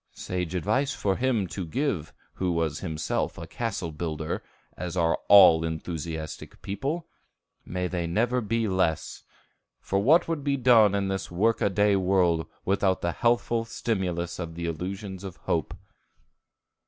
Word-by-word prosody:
Sage 90 -1 -3
advice 130 - 0
for 95 -5 0
him 120 -5 +1
to 95 - -4
give 85 - -2 0.2
who 90 -1 -1
was 80 -3 -1
himself 80 -4 -2
a - - -6
castle 105 -8 -3
builder, 80 0 -3 0.3
as 90 0 -5
are 85 -1 +2
all 90 -5 +8
enthusiastic 80 -1 -5
people, 140 - -3 0.6
may 90 0 -2
they 85 -2 -2
never 120 +8 +1
be 115 +1 0
less; 95 -5 0 0.6
for 95 - -1
what 150 - +4
would 165 -4 -2
be 140 -1 +1
done 115 -5 +5
in 100 -1 0
this 95 0 -3
work 110 +6 +1
a - - +3
day 105 +1 +3
world 90 -4 +2 0.2
without 95 -1 +1
the 85 - 0
healthful 120 +1 +1
stimulus 90 -7 -2
of 85 -2 -5
the 85 0 -4
illusions 95 +4 -5
of 95 -3 -7
hope? - - -1
95 Hz, 150 wpm, -27 LUFS, 85-115 Hz, 0.6 s, all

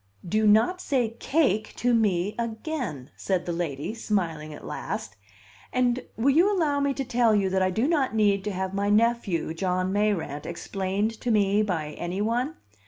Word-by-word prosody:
"Do 215 +4 +2
not 230 - +4
say 250 -5 +1
cake 260 - +1
to 245 0 +1
me 205 -3 +2
again!" 225 - -4
said 185 -3 -1
the 175 - -2
lady, 160 0 -3
smiling 170 -9 -2
at 150 - -10
last. 100 - -5 0.6
"And 250 0 +1
will 255 +5 +3
you 365 +6 +5
allow 310 -7 +1
me 280 0 +1
to 270 - -3
tell 235 -3 +3
you 195 -2 +1
that 190 0 +1
I 185 - +3
do 220 +8 0
not 285 -8 +1
need 200 -3 +3
to 210 - -1
have 190 0 -3
my 200 +1 0
nephew, 210 -7 +1
John 185 +2 -1
Mayrant, 200 -8 -1
explained 195 +5 -2
to 245 - -2
me 205 -2 +3
by 170 -8 -1
any 175 +3 -3
one? 240 +8 0
210 Hz, 175 wpm, -26 LUFS, 185-240 Hz, 0.6 s, you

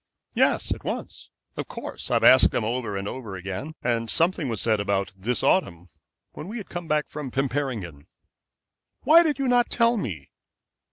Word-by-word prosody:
"Yes, - - +2
at - - -11
once. - - -6 0.3
Of - - -5
course, - - -7
I've - - +1
asked - - +7
them - - -2
over 115 -2 -2
and 100 0 -4
over 110 -5 -6
again, 95 - -6
and 115 -1 0
something 165 -2 +1
was 115 -3 -2
said 110 0 +1
about 100 -2 -1
this 110 +6 -1
autumn, 90 - +1 0.5
when 155 - -9
we 220 +4 -6
had 210 - -8
come 175 -2 -6
back 150 -1 0
from 150 -3 -6
Pimperingen." 125 - -3 0.9
"Why 330 +2 +7
did 310 -4 0
you 275 -1 -1
not 245 -1 +3
tell 235 0 +3
me?" 90 - -5
125 Hz, 175 wpm, -25 LUFS, -, 0.9 s, asked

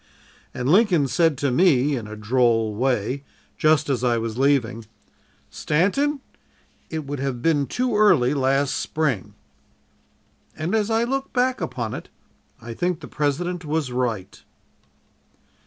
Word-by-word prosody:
"And 125 - -4
Lincoln 175 -4 +4
said 150 +3 +2
to 140 -1 0
me 145 -2 +3
in 115 -4 -5
a 110 - -8
droll 115 0 +1
way, 125 +3 -1 0.3
just 155 -1 +2
as 130 -3 -1
I 120 -2 +2
was 115 -1 -3
leaving, 125 -5 +1 0.6
'Stanton, 275 - 0 0.7
it 160 -2 -4
would 145 0 -5
have 130 -3 -3
been 145 -4 +2
too 250 -2 -1
early 175 -12 +4
last 135 0 +1
Spring.' 150 -10 -2 1.2
"And 155 +5 -3
as 220 -1 +1
I 225 +1 +2
look 270 +3 -2
back 255 -3 +1
upon 120 -9 -3
it, - - -7 0.5
I 115 +1 -8
think 175 +6 -1
the 155 - -8
President 170 +5 -2
was 150 -3 -2
right." 115 -6 -3
140 Hz, 140 wpm, -23 LUFS, 125-175 Hz, 1.2 s, Lincoln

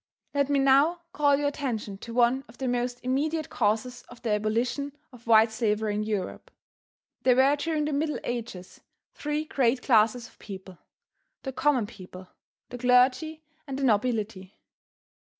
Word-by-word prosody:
Let 280 -1 +1
me 285 - +2
now 275 +6 +4
call 285 -2 +3
your 285 0 +1
attention 225 -9 -4
to 235 - -9
one 245 +3 +2
of 230 - -17
the 265 - -3
most 245 0 -1
immediate 300 +5 -1
causes 230 +2 0
of 245 - -13
the 225 - -1
abolition 230 +7 -1 0.2
of 235 -1 -16
white 220 0 +6
slavery 220 -2 0
in 210 - -1
Europe. 210 -3 -4 0.7
There 250 -1 +4
were 270 +3 +5
during 305 0 -1
the 300 - -2
Middle 300 +1 0
Ages 230 -7 -6 0.3
three 300 +1 -3
great 250 -4 +1
classes 230 0 +3
of - - -23
people: 190 -3 -10 0.6
the 265 - -5
common 260 -4 +2
people, 185 -4 -12 0.4
the 245 - -7
clergy 255 +6 +3 0.2
and 270 -1 -4
the 275 - -3
nobility. 215 -4 0
245 Hz, 155 wpm, -27 LUFS, 220-280 Hz, 0.7 s, white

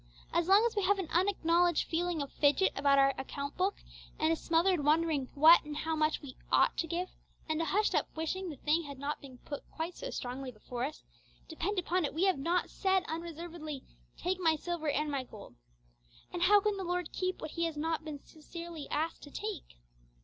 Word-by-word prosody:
As 340 0 +2
long 400 +4 +6
as 470 - 0
we 410 - +1
have 400 +1 +3
an 375 -5 -4
unacknowledged 350 -2 +2
feeling 335 -2 0
of 280 - -9
fidget 290 +6 +3
about 280 0 +4
our 275 0 +5
account 280 +1 -5
book, 380 +2 -1 0.3
and 315 +1 +2
a - - +2
smothered 335 0 +2
wondering 300 -3 +2
what 315 +4 +8
and 295 0 -6
how 320 +1 -1
much 310 0 +1
we 260 -3 -9 0.2
'ought' - - +4
to 330 - -1
give, 350 +3 -2 0.4
and 315 0 0
a - - 0
hushed 420 +5 +2
up - - +2
wishing 350 +4 -2
the 305 - -6
thing 305 +4 +1
had 280 -1 -8
not 285 +2 -3
been 265 -3 -11
put 285 - -5
quite 335 +2 -4
so - - -6
strongly 255 - -5
before 240 +2 -4
us, 305 +2 -7 0.4
depend 350 +5 -3
upon 360 0 +1
it 290 - -2
we 335 - +1
have 375 -7 +2
not 345 +6 0
said 380 -1 +2
unreservedly, 325 -3 -6 0.3
'Take 370 +1 -1
my 325 -3 +3
silver 315 0 -3
and 295 +1 0
my 275 -2 -1
gold.' 215 -5 -12 0.8
And 350 - -3
how 405 +3 +6
can 420 0 0
the 385 - -3
Lord 355 -2 -2
keep 370 0 -2
what 310 - -6
He 335 - -1
has 325 -2 -3
not 320 +1 -1
been 300 -3 -7
sincerely 330 -1 -8
asked 320 +2 -1
to 290 - -10
take? 405 - -6
325 Hz, 210 wpm, -32 LUFS, 295-360 Hz, 0.8 s, what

